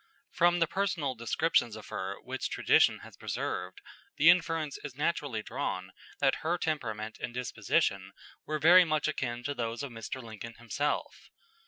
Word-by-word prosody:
From 175 0 +4
the 170 - +4
personal 165 -7 -1
descriptions 120 0 +1
of 110 - -10
her 100 -2 -3
which - - -3
tradition - - +4
has - - -12
preserved, - - -4 0.4
the 160 +4 +8
inference 165 -4 0
is 145 -4 -7
naturally 145 -6 -1
drawn 95 -8 -3 0.3
that 135 -1 +3
her 170 +3 0
temperament 110 -10 -3
and 120 - -5
disposition 125 -1 0 0.3
were 155 - -2
very 175 +4 +8
much 155 -3 0
akin 120 -5 -2
to 145 +3 -2
those 120 0 -3
of 140 - -5
Mr. 115 +3 -6
Lincoln 115 -1 -8
himself. 120 +5 -3
140 Hz, 155 wpm, -30 LUFS, 115-160 Hz, 0.4 s, the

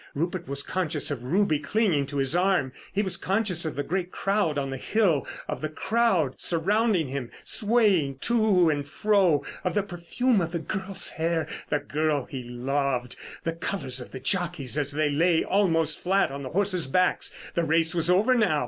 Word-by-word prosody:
Rupert 170 +3 -2
was 140 0 -2
conscious 180 -5 -2
of 135 -4 -3
Ruby 160 +2 +1
clinging 155 -3 +1
to 145 - -5
his 135 +4 +3
arm. 180 -8 +2 0.2
He 205 +2 0
was 190 - -1
conscious 190 -4 0
of 155 - -3
the 145 - -2
great 180 +3 -2
crowd 195 -7 0
on 135 -1 -2
the 135 - -4
hill, 180 - +1 0.2
of - - -4
the 155 - -2
crowd 185 - +1
surrounding 185 - +1
him, 130 -3 -4
swaying 205 - +2
to 215 -8 +3
and 145 -1 -3
fro; 180 -2 +2 0.2
of 180 - -1
the 205 - +2
perfume 195 +5 0
of 170 0 -3
the - - 0
girl's 190 +3 -4
hair—the 160 -2 -2
girl 150 -2 -1
he 130 - -6
loved; 125 0 -2 0.3
the 165 - -1
colours 135 -7 -3
of 125 - -9
the 130 - -8
jockeys 160 -2 0
as 145 -2 0
they 150 0 0
lay 165 +3 +3
almost 165 -6 +2
flat 190 -3 +2
on 140 +1 -6
the 130 - -5
horses' 185 -2 +1
backs. 185 +7 +1 0.2
The 170 - 0
race 160 0 +2
was 170 0 0
over 205 +8 +4
now. 210 -11 +2
165 Hz, 185 wpm, -26 LUFS, 145-195 Hz, 0.3 s, over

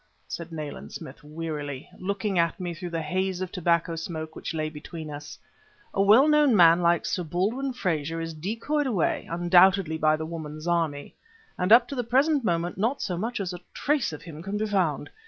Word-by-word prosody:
said 170 0 -6
Nayland 155 -3 -6
Smith 130 - -9
wearily, 150 -3 -5
looking 200 0 -1
at 170 +3 +1
me 175 -2 -3
through 175 +1 -6
the 165 -1 -3
haze 185 +3 -1
of 185 -1 -4
tobacco 170 -2 +1
smoke 160 -1 -5
which - - -5
lay 155 -1 -2
between 155 +1 -8
us. 145 0 -8 0.6
"A 195 - +1
well 215 +9 +6
known 300 -5 +5
man 170 -2 +7
like 170 0 +2
Sir 180 - -1
Baldwin 205 - -1
Frazer 165 - -2
is 165 0 -4
decoyed 230 - -2
away 205 -10 0
undoubtedly 175 -1 +4
by 155 0 +4
the 155 0 -4
woman 155 -2 -6
Zarmi; 160 -3 -1 0.4
and 180 +3 -1
up 240 +1 +8
to 280 - -6
the 250 -3 -1
present 270 +4 +2
moment 175 -2 -1
not 235 +7 +1
so 180 - -2
much 225 +7 -3
as 185 -2 -3
a 175 - -7 0.2
trace 290 - +1
of 155 - -8
him 160 -2 -9
can 195 +4 -3
be 215 - 0
found. 180 -9 0
175 Hz, 195 wpm, -26 LUFS, 160-205 Hz, 0.6 s, up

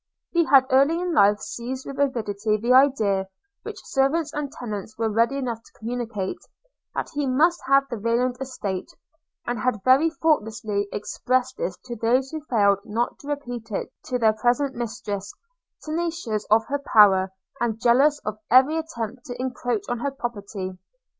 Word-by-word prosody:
– - - -63
He 340 -1 +3
had 270 -4 +6
early 280 +6 +4
in 355 -1 -2
life 205 -4 +4
seized 255 +2 -5
with 275 - -7
avidity 215 -6 0
the 235 +4 +2
idea, 220 -8 +4 0.3
which 425 -2 -9
servants 290 +3 +1
and 290 -2 -3
tenants 215 -4 -6
were 225 -1 0
ready 230 +5 +2
enough 240 -4 -3
to - - -21
communicate, 225 -4 -4 0.6
that - - -3
he 290 -1 -1
must 320 +7 +3
have 275 0 +4
the 240 -4 -5
Rayland 235 +3 0
estate; 205 -8 -4 0.6
and 240 0 -2
had 250 -6 -1
very 270 +6 +5
thoughtlessly 220 -10 0
expressed 255 - -1
this - - -3
to 240 -1 -5
those 250 +4 +1
who 315 -2 -5
failed 200 -4 +3
not 230 +4 -2
to 280 - -13
repeat 245 -6 -5
it 205 - -4
to 250 - -1
their 220 -3 +4
present 245 +5 +1
mistress, 205 -4 -4 0.5
tenacious 320 -9 -2
of 220 +1 +4
her 285 +1 -2
power, 195 -7 +5 0.3
and 225 -2 -1
jealous 270 +6 +4
of 215 0 -4
every 265 +6 +5
attempt 240 -6 -5
to 245 - -7
encroach 245 -3 -2
on 245 -1 -2
her 280 - -1
property. 205 -8 -6
245 Hz, 165 wpm, -24 LUFS, 215-275 Hz, 0.6 s, had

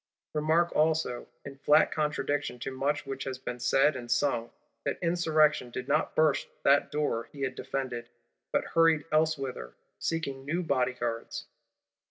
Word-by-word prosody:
Remark 160 +3 +2
also, 155 -5 +1 0.2
in 140 -1 -9
flat 150 +2 +5
contradiction 145 -3 -1
to 125 - -5
much 145 +3 -1
which 135 -1 -5
has 130 -1 -4
been 125 -1 -6
said 135 +4 +3
and 120 -2 -7
sung, 120 -1 +1 0.3
that - - -1
Insurrection 160 -6 +2
did 125 +1 -6
not 150 +2 +1
burst 155 -2 +3 0.2
that 140 +1 +4
door 145 -6 -1
he 140 - -10
had 130 -1 -1
defended; 125 -3 -4 0.4
but - - +1
hurried 165 -2 +4
elsewhither, 140 - 0 0.2
seeking 140 -5 -2
new 170 +6 -1
bodyguards. 125 -5 -1
140 Hz, 145 wpm, -29 LUFS, 130-155 Hz, 0.4 s, flat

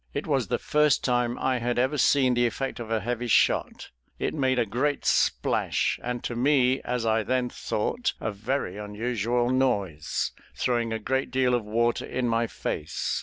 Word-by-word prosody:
It - - -2
was - - 0
the - - 0
first 150 -1 +2
time 120 -1 +1
I 130 -1 0
had 120 +1 -1
ever 130 +4 +1
seen 130 -1 +4
the 120 0 +3
effect 135 +3 -4
of 115 -2 -6
a 110 -1 0
heavy 120 +3 -2
shot; 115 - +1 0.3
it - - -2
made 130 -3 +1
a 120 - +2
great 135 +7 -1
splash, - - +1
and 120 0 -3
to 120 - -3
me 130 0 +3
as 125 -1 -2
I 110 0 +2
then 125 +2 0
thought, 240 - -2
a 110 - -2
very 105 -1 -3
unusual 115 +3 -1
noise, 100 - 0 0.2
throwing 120 -2 0
a 110 - -1
great 130 +5 -1
deal 130 0 +2
of 120 -2 +1
water 115 +2 +1
in 125 -1 -1
my 115 0 +1
face. 75 - -3
120 Hz, 180 wpm, -26 LUFS, 115-130 Hz, 0.3 s, seen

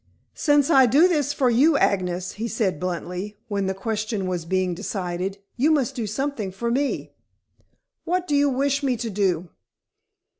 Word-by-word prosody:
"Since 290 0 +2
I 265 -4 +7
do 295 +10 +5
this 295 -5 +1
for 255 -4 +2
you, 285 +6 +4
Agnes," 180 -2 0
he 225 +2 -4
said 210 -7 -1
bluntly, 180 +3 -4
when 200 -2 -1
the 190 - -1
question 215 0 -2
was 180 -3 -3
being 185 +1 0
decided, 185 0 -3 0.2
"you 280 +6 +3
must 275 -4 +2
do 235 -5 -3
something 220 -2 -3
for 235 +5 -3
me." 275 +3 -1 0.9
"What 360 +1 -1
do 295 - +1
you 285 0 +4
wish 275 +2 0
me 260 -4 0
to 230 -1 -4
do?" 185 -4 0
220 Hz, 165 wpm, -24 LUFS, 190-275 Hz, 0.9 s, I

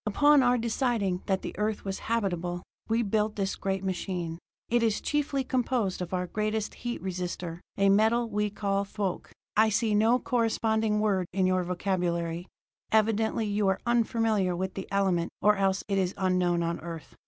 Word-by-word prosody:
"Upon 290 +6 +5
our 250 -1 +4
deciding 225 -5 0
that 190 -1 0
the - - -5
Earth 210 0 -1
was 195 -1 -3
habitable, 175 -6 -1 0.3
we 230 +1 +2
built 215 0 0
this 195 -2 -1
great 195 0 -2
machine. 180 -3 -3 0.3
It 240 0 +2
is 225 -2 +1
chiefly 290 -2 0
composed 245 -7 0
of 180 - -4
our 180 -1 -1
greatest 215 +2 -2
heat 240 0 -4
resister, 180 -2 -4 0.2
a 200 0 +3
metal 220 +4 +3
we 210 -1 0
call 200 -1 -1
thoque; 200 -2 -3 0.3
I 220 +1 +5
see 215 +1 +1
no 220 +4 +4
corresponding 220 -3 +1
word 195 -4 +1
in 190 0 +2
your 185 0 +2
vocabulary; 175 -1 -1 0.4
evidently 220 +1 +2
you 205 -1 0
are 190 - +2
unfamiliar 225 -5 +1
with 190 +1 -3
the 195 - -6
element, 190 -4 +1
or 210 0 +4
else 195 0 +1
it 195 -1 +1
is 185 -1 -1
unknown 180 -2 +1
on 170 0 -2
Earth. 165 -1 -8
200 Hz, 170 wpm, -28 LUFS, 185-220 Hz, 0.4 s, Upon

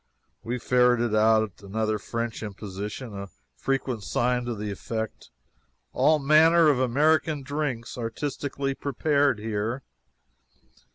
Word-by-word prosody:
We 120 +3 -3
ferreted 125 -2 +2
out 110 -2 +3
another 110 +2 -1
French 115 +2 -4
imposition 105 +3 -6
a 100 0 -6 0.3
frequent 130 -5 -2
sign 125 +2 0
to 120 -1 -3
this 105 0 -4
effect: 110 -1 -5 0.6
"ALL 155 0 +4
MANNER 155 +3 +5
OF 140 -4 +2
AMERICAN 145 +3 +2
DRINKS 130 -4 -3
ARTISTICALLY 135 +3 -3
PREPARED 140 -1 +1
HERE." 110 +4 -3
120 Hz, 110 wpm, -26 LUFS, 110-140 Hz, 0.6 s, MANNER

